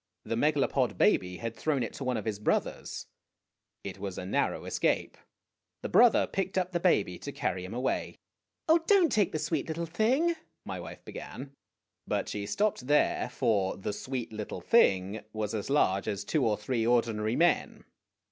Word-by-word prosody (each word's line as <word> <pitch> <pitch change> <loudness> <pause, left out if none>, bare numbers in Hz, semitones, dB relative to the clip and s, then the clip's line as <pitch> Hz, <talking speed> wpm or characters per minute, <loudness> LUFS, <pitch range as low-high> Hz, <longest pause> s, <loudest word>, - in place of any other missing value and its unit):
The - - -2
Megalopod 145 +3 +1
baby 90 0 +2
had 115 -1 -5
thrown 145 -3 0
it 115 - -5
to - - -6
one 130 -2 0
of 105 - -5
his 105 -2 -2
brothers. 105 - -1 0.8
It 95 -1 -7
was 95 -2 -5
a 90 - -5
narrow 95 - -1
escape. - - 0 0.7
The - - -3
brother 240 -1 +6
picked 195 0 -3
up 180 -1 0
the 175 - 0
baby 105 - +2
to - - -6
carry 90 0 -2
him 95 +5 -6
away. 130 +2 -1 0.5
"Oh, 325 +1 +6
don't 385 -5 +5
take 205 -4 +2
the - - -1
sweet 150 -1 -2
little 165 +1 -3
thing 245 - +2 0.3
my - - -5
wife - - -10
began; 135 +1 -8 0.6
but - - -1
she 100 -1 -4
stopped 200 - 0
there, 145 -3 +2
for 100 -6 0
"the 100 +2 -3
sweet 125 0 -5
little 105 -1 -5
thing" 100 - +3
was 110 -1 -3
as 105 +1 -3
large 100 -9 +2
as 100 -2 -2
two 155 -4 +1
or 105 -2 +1
three 115 +2 -1
ordinary 115 -2 +1
men. 170 0 +1
120 Hz, 175 wpm, -29 LUFS, 105-165 Hz, 0.8 s, brother